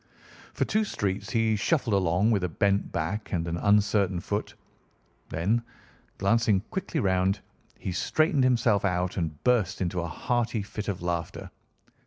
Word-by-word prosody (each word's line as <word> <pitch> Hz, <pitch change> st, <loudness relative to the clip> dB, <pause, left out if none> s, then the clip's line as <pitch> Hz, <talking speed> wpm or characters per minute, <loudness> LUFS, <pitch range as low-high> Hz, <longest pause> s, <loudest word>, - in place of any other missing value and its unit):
For -, -, +1 dB
two 215 Hz, +1 st, +1 dB
streets 100 Hz, -, -2 dB
he 115 Hz, -1 st, +2 dB
shuffled 120 Hz, +1 st, +1 dB
along 95 Hz, +3 st, +2 dB
with 100 Hz, -4 st, +1 dB
a 90 Hz, -, 0 dB
bent 100 Hz, +4 st, +1 dB
back 85 Hz, +7 st, -3 dB
and 85 Hz, -2 st, -1 dB
an 85 Hz, -, -2 dB
uncertain 100 Hz, -1 st, +2 dB
foot. 105 Hz, +4 st, -3 dB, 0.7 s
Then, 100 Hz, +9 st, +1 dB, 0.6 s
glancing 105 Hz, 0 st, +2 dB
quickly 185 Hz, -4 st, -2 dB
round, 95 Hz, -3 st, +2 dB, 0.4 s
he 95 Hz, -, -4 dB
straightened 155 Hz, -, +2 dB
himself 120 Hz, -5 st, +3 dB
out 90 Hz, -1 st, 0 dB
and 80 Hz, -5 st, -3 dB
burst 110 Hz, -6 st, +2 dB
into 90 Hz, -1 st, -1 dB
a 85 Hz, -, -3 dB
hearty 115 Hz, +5 st, -1 dB
fit 105 Hz, +1 st, -6 dB
of 95 Hz, -4 st, -3 dB
laughter. 85 Hz, -2 st, -3 dB
100 Hz, 150 wpm, -27 LUFS, 90-115 Hz, 0.7 s, himself